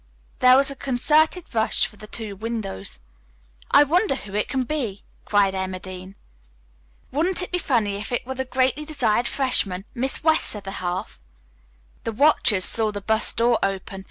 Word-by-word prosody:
There 255 0 +7
was 275 0 +3
a - - -7
concerted 305 +7 +1
rush 220 -1 +2
for - - -9
the 215 +1 -12
two 215 -2 -5
windows. 200 - -5 0.7
"I 290 - +7
wonder 340 +2 +2
who 205 -6 -10
it 210 0 -1
can 260 0 0
be!" 240 -8 -4 0.2
cried 200 -2 +2
Emma 190 -1 -3
Dean. 185 +1 -10 1.0
"Wouldn't 350 +6 0
it - - -7
be 360 - 0
funny 220 - 0
if 210 - -7
it 245 - -2
were 265 - -4
the 265 0 -3
greatly 260 +2 0
desired 245 -7 0
freshman, 205 -9 0
Miss 265 +4 -1
West's 315 -7 +4
other 195 -2 -7
half?" 180 - -5 0.8
The 230 - -3
watchers 220 -7 +4
saw 220 -1 +1
the 205 - -5
bus 220 +3 +2
door 235 0 +2
open. 195 0 -3
230 Hz, 170 wpm, -23 LUFS, 200-270 Hz, 1.0 s, There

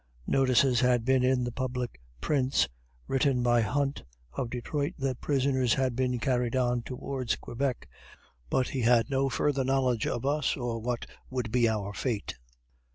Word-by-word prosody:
Notices 130 -2 +3
had 125 -2 +2
been 130 -1 +3
in 130 -1 +2
the 120 - -2
public 125 - -4 0.2
prints, 135 -2 +2 0.4
written 135 -2 +2
by 120 -1 +4
Hunt, 140 +5 -1 0.3
of 125 -3 -3
Detroit, 140 +4 -2
that 135 -2 -2
prisoners 130 -4 +2
had 130 -3 0
been 125 0 0
carried 125 0 0
on 125 -1 +1
towards 130 0 -3
Quebec 130 +1 -3 0.6
but 130 - +1
he 130 - -2
had 120 +2 +3
no 135 0 +2
further 140 0 +1
knowledge 130 -3 +1
of 120 +2 -2
us, 145 0 +1
or 120 -3 -2
what 120 +1 -3 0.2
would 125 -4 -3
be 120 -1 +3
our 100 -2 -2
fate. 110 -3 -2
125 Hz, 160 wpm, -29 LUFS, 120-135 Hz, 0.6 s, by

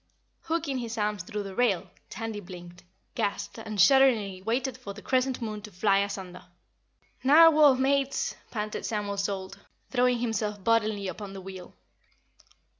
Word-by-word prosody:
Hooking 320 -5 -1
his 230 -1 -5
arms 210 -2 -1
through 210 +3 -5
the 195 -1 -7
rail, 220 -5 +1 0.2
Tandy 225 -2 -5
blinked, 175 -2 -11 0.3
gasped 215 0 -3
and 215 -2 -6
shudderingly 230 -9 +4
waited 245 +5 -1
for 215 -6 -9
the 210 - -10
Crescent 260 -1 0
Moon 215 -2 -4
to 210 - -10
fly 195 +2 +2
asunder. 190 -3 -4 0.8
"Narwhal, 300 0 +7
Mates!" 275 +1 +1 0.2
panted 215 -2 -4
Samuel 205 -2 -2
Salt, 195 -1 -3 0.3
throwing 250 -1 +3
himself 220 -4 -2
bodily 215 -3 +1
upon 195 +1 -7
the 195 - -8
wheel. 185 -1 -10
215 Hz, 140 wpm, -28 LUFS, 195-250 Hz, 0.8 s, Narwhal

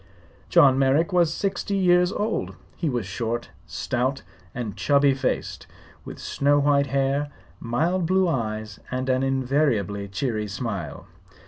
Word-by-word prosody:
John 135 -1 +5
Merrick 145 +7 +2
was 170 -3 +3
sixty 200 +2 -2
years 180 -1 +4
old. 215 +2 -2 0.2
He 165 - -1
was 120 -6 -2
short, 115 +4 -3 0.2
stout 130 +2 -2 0.3
and 115 -4 -4
chubby 140 -1 +3
faced, 135 -1 -3 0.4
with - - -8
snow 145 +1 +1
white 140 -1 +3
hair, 140 +2 0 0.3
mild 165 +9 0
blue 190 +1 +3
eyes 110 -7 -3
and 130 +1 -3
an 130 0 +2
invariably 130 -7 0
cheery 110 +1 -2
smile. 100 - -5
135 Hz, 130 wpm, -24 LUFS, 115-155 Hz, 0.4 s, John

